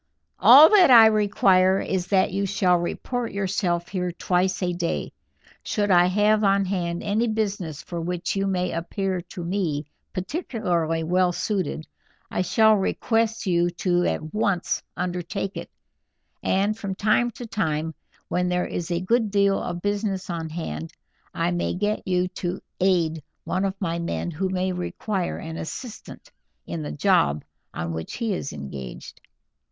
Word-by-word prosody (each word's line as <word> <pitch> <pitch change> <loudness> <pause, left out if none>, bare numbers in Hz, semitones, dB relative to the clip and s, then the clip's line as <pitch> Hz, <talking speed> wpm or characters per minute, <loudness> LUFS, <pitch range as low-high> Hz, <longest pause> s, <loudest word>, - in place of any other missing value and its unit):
All 280 +6 +10
that 380 -7 +6
I 230 -3 +10
require 195 -3 +4
is 185 -2 -2
that 190 -2 +2
you 200 +1 0
shall 185 -2 +2
report 240 +7 -3
yourself 185 -3 -1
here 180 -2 -2
twice 180 +2 0
a 180 -1 0
day. 175 -1 -3 0.5
Should 205 -2 -1
I 175 -1 +6
have 210 +3 +3
on 195 0 +3
hand 175 -3 -2
any 215 +4 +1
business 200 -9 -2
for 170 -1 -5
which 175 +2 -2
you 195 0 0
may 180 -1 0
appear 185 +2 -2
to 175 0 -8
me 170 -5 -1 0.3
particularly 180 - -2
well 180 +2 +2
suited, 180 -4 -2 0.5
I - - 0
shall 220 +4 +4
request 225 +3 0
you 175 -2 +2
to 175 0 0
at 155 0 -2
once 200 -4 0 0.2
undertake 180 +2 -3
it, - - -6 0.7
and 200 +3 +1
from 200 -3 -5
time 215 +4 +2
to 245 - -6
time, 160 -7 -2 0.3
when 180 0 0
there 180 0 0
is 170 -1 -4
a 170 0 -1
good 225 +3 +1
deal 200 -1 +2
of 175 0 -5
business 200 -2 -2
on 165 -1 -4
hand, 80 - -5 0.4
I 170 +1 -1
may 175 0 -1
get 210 +2 -2
you 180 -1 +1
to 180 0 -4 0.2
aid 170 -4 +2 0.2
one 190 +1 -1
of 195 0 -3
my 170 -3 -2
men 170 +1 -3
who 185 +4 -2
may 185 0 -1
require 180 +1 -3
an 160 0 -7
assistant 230 +8 -8 0.3
in 85 -2 -5
the 75 -1 -5
job 75 0 +2 0.3
on 85 0 -4
which 80 0 -5
he 230 -4 -1
is 140 - -4
engaged." 70 -3 -8
185 Hz, 160 wpm, -24 LUFS, 170-200 Hz, 0.7 s, All